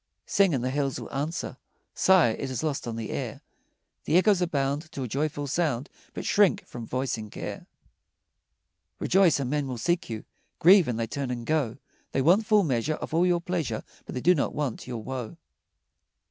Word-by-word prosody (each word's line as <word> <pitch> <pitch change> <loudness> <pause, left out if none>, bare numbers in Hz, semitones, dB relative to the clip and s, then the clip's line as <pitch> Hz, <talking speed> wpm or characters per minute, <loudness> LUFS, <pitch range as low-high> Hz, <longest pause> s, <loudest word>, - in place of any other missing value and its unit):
Sing, 195 -2 +3
and 130 -5 0
the 130 - 0
hills 140 -1 -1
will - - -9
answer; 145 +5 -3 0.4
Sigh, 185 -9 +5
it 135 +4 -3
is 130 0 -3
lost 145 -5 -2
on 115 - -3
the 115 -2 -5
air; - - -4 0.6
The 165 - +4
echoes 185 -1 +4
bound 145 +1 -1
To 135 - -4
a - - -3
joyful 145 +3 -2
sound, 145 -3 -1 0.2
But - - -5
shrink 205 -3 +3
from 115 -2 -8
voicing 125 -4 -2
care. - - -7 1.3
Rejoice, 185 -5 +4
and 130 -2 -2
men 145 -2 0
will 125 -2 -4
seek 175 +7 0
you; 110 -2 -5 0.3
Grieve, 185 0 +7
and 120 -2 -2
they 115 - 0
turn 135 +3 -4
and 120 -2 -4
go; 140 -6 0 0.4
They 135 - +2
want 190 +8 +4
full 210 -2 +5
measure 145 0 0
Of - - -7
all 170 +3 +4
your 175 -1 +2
pleasure, 165 -11 -2 0.2
But - - -6
they 125 - -2
do 180 - +5
not 145 - -1
want 145 -6 -3
your 120 -3 -5
woe. 130 +4 -5
140 Hz, 190 wpm, -27 LUFS, 125-170 Hz, 1.3 s, Grieve